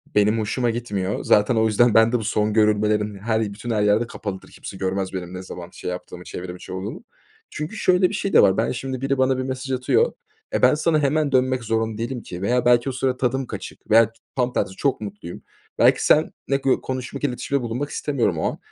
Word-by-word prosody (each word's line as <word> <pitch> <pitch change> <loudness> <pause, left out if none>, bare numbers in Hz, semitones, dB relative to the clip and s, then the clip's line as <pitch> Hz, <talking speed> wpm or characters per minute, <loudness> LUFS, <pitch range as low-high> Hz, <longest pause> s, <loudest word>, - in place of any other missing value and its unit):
benim 105 +2 +3
hoşuma 120 +3 0
gitmiyor. 105 -4 -2
Zaten 105 +3 +3
o 110 0 +3
yüzden 115 +1 +3
ben 115 +1 +5
de 125 - +2
bu - - -5
son 105 0 0
görülmelerim 105 -1 +2
her 110 +1 0
bütün 110 +3 -4
her 105 -2 +1
yerde 105 +3 +2
kapalıdır. 100 -5 -7
Kimse 95 - -9
görmez, 95 0 -2
benim 90 -1 -5
ne 90 0 -6
zaman 90 -1 -8
şey - - -6
yaptığımı, 90 0 -7
çevrim 90 0 -7
içi, 90 - -11
olduğumu. 100 - -6 0.5
Çünkü 150 +8 -5
şöyle 180 -2 +3
bir - - -7
şey 195 - -2
de - - +8
var. 95 0 +4
Ben 115 - +1
şimdi, 130 0 -4
biri 135 0 0
bana 130 0 +2
bir 130 - -2
mesaj 130 0 -4
atıyor. 130 - +2 0.4
E, - - 0
ben - - +6
sana 155 0 +2
hemen 150 0 +1
dönmek 130 -1 +2
zorunda 110 -1 -1
değilim 120 +2 -4
ki 90 +1 -8
veya 125 +4 +1
belki 120 +2 +4
o - - -1
sıra 130 0 -1
tadım 130 +1 -1
kaçık 105 -2 -9
veya 115 +1 +7
ç - - -27 0.2
tam 125 -1 0
tersi 95 - -1
çok 135 0 0
mutluyum. 100 -4 -8 0.4
Belki - - +4
seninle 135 - +2
gö 135 - +2
konuşmak, 130 +2 -5
iletişimde 140 0 -1
bulunmak 125 +5 -3
istemiyorum 120 - -1
o - - -2
an. - - -10
115 Hz, 220 wpm, -22 LUFS, 105-130 Hz, 0.5 s, de